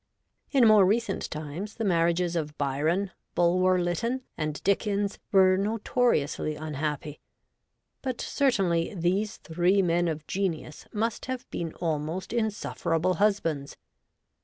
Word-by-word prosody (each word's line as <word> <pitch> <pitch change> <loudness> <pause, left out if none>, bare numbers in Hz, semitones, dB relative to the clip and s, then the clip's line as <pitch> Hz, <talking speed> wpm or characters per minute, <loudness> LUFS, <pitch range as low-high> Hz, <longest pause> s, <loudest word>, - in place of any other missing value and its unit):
In 260 -5 +5
more 215 -2 +7
recent 205 +1 0
times, 155 +7 -6
the 230 - -3
marriages 170 -1 +2
of 150 -2 -3
Byron, 155 +8 0 0.2
Bulwer 185 +1 +3
Lytton, 230 +9 -1
and 155 -1 -3
Dickens 200 0 0
were 185 -1 +5
notoriously 200 -7 0
un 155 -1 -5
happy; 150 0 -3 0.8
but, 255 -3 -3
certainly, 195 - +1
these 195 +5 0
three 180 +4 +2
men 175 0 +2
of 155 -2 -3
genius 170 -6 -3
must 225 +3 -2
have 255 -1 -4
been 165 -2 -4
almost 160 +4 -3
insufferable 185 -6 0
husbands. 165 -9 0
180 Hz, 120 wpm, -27 LUFS, 160-205 Hz, 0.8 s, more